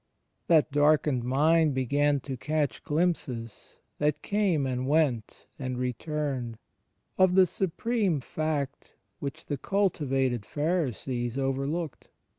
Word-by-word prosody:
That 155 -2 +4
darkened 145 -3 +3
mind 150 +4 +3
began 140 +2 +2
to 135 0 -5
catch 150 +2 -1
glimpses, 145 -8 -2 0.2
that 150 0 0
came 195 -8 +1
and 130 0 -2
went 140 -7 0
and 130 -2 -3
returned, 125 -1 -3 0.6
of 185 -1 +5
the 190 -1 +7
supreme 190 0 0
Fact 145 0 -3 0.2
which 145 +3 -6
the 145 - -3
cultivated 135 - 0
Pharisees 130 - -2
overlooked 135 +3 -2
145 Hz, 105 wpm, -28 LUFS, 130-160 Hz, 0.6 s, the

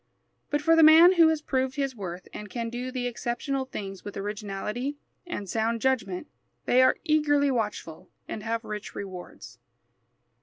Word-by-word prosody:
But 295 0 -1
for 330 +2 +5
the 325 - +6
man 320 +3 +9
who 335 -3 +6
has 315 -1 0
proved 260 -2 -1
his 275 -3 -2
worth 185 -4 -7
and 210 -1 -8
can 230 -2 -4
do 245 +1 -4
the 255 -1 -3
exceptional 245 +3 -2
things 195 -6 -7
with 205 - -7
originality 210 +6 -4 0.3
and 205 - -5
sound 225 +3 0
judgment, 230 -6 0 0.4
they 255 - +4
are 260 0 +4
eagerly 290 -3 +3
watchful 210 -9 -4 0.2
and 215 - -5
have 225 +1 -2
rich 210 -1 -6
rewards. 185 -3 -9
245 Hz, 160 wpm, -27 LUFS, 210-285 Hz, 0.4 s, man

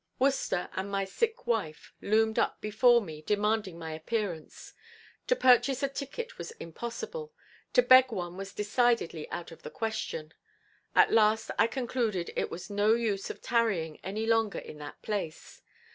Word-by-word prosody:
Worcester 265 -9 +1
and 190 +1 -3
my 195 0 -1
sick 445 - -2
wife 215 -10 -2
loomed 220 +1 +2
up - - 0
before 235 +3 +4
me 155 -4 -8
demanding 210 0 0
my 160 -1 -6
appearance. 165 0 -4 0.5
To - - +4
purchase 260 - +4
a - - +3
ticket 280 - -6
was - - -5
impossible, 450 - -6 0.4
to - - +6
beg 255 - +7
one 175 -4 -4
was 195 +1 -6
decidedly 210 -6 0
out 175 - -6
of 165 - -13
the - - -7
question. 215 -7 -4 0.6
At - - +6
last 220 0 +3
I 225 - +6
concluded 230 -6 -2
it - - -1
was 175 - -7
no 205 +2 +3
use 215 -4 -1
of - - -8
tarrying 200 -10 0
any 210 +4 -3
longer 225 -2 +2
in 150 - -8
that 145 0 -9
place. 200 -7 -4
215 Hz, 160 wpm, -30 LUFS, 180-240 Hz, 0.6 s, beg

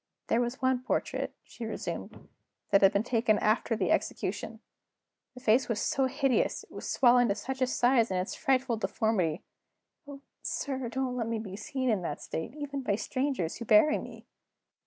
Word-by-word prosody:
"There 230 - +3
was 245 +2 -3
one 260 -1 +2
portrait," 255 - -2
she 240 - -10
resumed, 220 - -6 0.4
"that 200 - +5
had 195 -1 +7
been 200 0 +1
taken 225 -3 +2
after 220 +2 +1
the 190 -5 0
execution. 210 +3 -2 0.8
The - - -9
face 245 +2 +3
was 220 -3 0
so 265 +3 +1
hideous; 270 -1 +1
it - - -20
was - - -6
swollen 245 -2 +5
to 200 - +1
such 265 +5 -5
a 255 - +3
size 245 -2 +3
in 185 - -1
its 180 +1 -2
frightful 260 -3 +1
deformity 195 -7 0 0.6
oh, 280 -1 -9 0.2
sir, 265 -4 -3
don't 255 +1 -2
let 230 -3 -2
me 230 0 -1
be 205 -3 -6
seen 260 +5 -3
in 215 -6 +2
that 150 -4 -4
state, 160 - -5
even 285 -2 -4
by 230 -6 0
the - - 0
strangers 255 - -2
who 235 - -6
bury 305 +4 +5
me! - - -10
240 Hz, 185 wpm, -30 LUFS, 215-260 Hz, 0.8 s, had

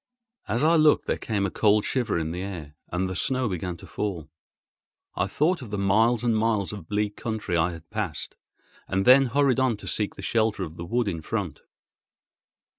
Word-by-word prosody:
As 115 +6 0
I 165 +2 +5
looked 155 -1 +4
there - - -1
came 105 -3 -1
a 95 - -2
cold 105 -1 +3
shiver 120 -8 0
in 80 -1 -2
the 90 +2 -4
air, 85 -7 -6 0.2
and 90 +2 -1
the 95 - -4
snow 130 +6 +1
began 90 -2 -3
to - - -13
fall. 85 -7 -4 0.8
I 90 - 0
thought 155 - +1
of 120 - -8
the 105 - -3
miles 110 +5 +3
and 115 -2 +2
miles 110 -3 +1
of 100 -6 -8
bleak 105 0 -1
country 110 -5 -3
I 85 +1 +3
had 80 -1 -11
passed, 100 -9 -4 0.5
and 95 +1 0
then 130 +1 +7
hurried 135 +1 +2
on 130 -4 +2
to - - -10
seek 105 -2 -1
the - - -9
shelter 110 -3 +1
of 80 -2 -7
the 85 - -6
wood 120 +4 0
in 85 -5 -2
front. - - -3
105 Hz, 200 wpm, -26 LUFS, 90-120 Hz, 0.8 s, then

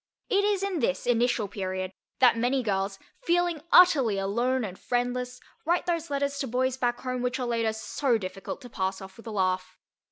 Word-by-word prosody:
It 405 -3 +3
is 405 -2 +1
in 390 -4 -1
this 275 - 0
initial 240 -2 +2
period 185 -1 -4 0.3
that 250 -3 +6
many 245 +3 +1
girls, 195 -2 -1 0.2
feeling 345 -2 +1
utterly 275 - +6
alone 235 +6 0
and 190 -3 -6
friendless, 250 0 -2 0.2
write 345 +3 +1
those 335 -2 -1
letters 280 0 -1
to 275 - -2
boys 255 +2 0
back 245 -2 -1
home 255 -1 -3
which 250 +1 -1
are 250 - -1
later 230 -2 0
so 235 +3 0
difficult 190 +5 -6
to 245 - -10
pass 190 -2 -2
off 190 -1 -11
with 230 - -13
a - - -3
laugh. 185 -2 -1
245 Hz, 190 wpm, -27 LUFS, 200-275 Hz, 0.3 s, that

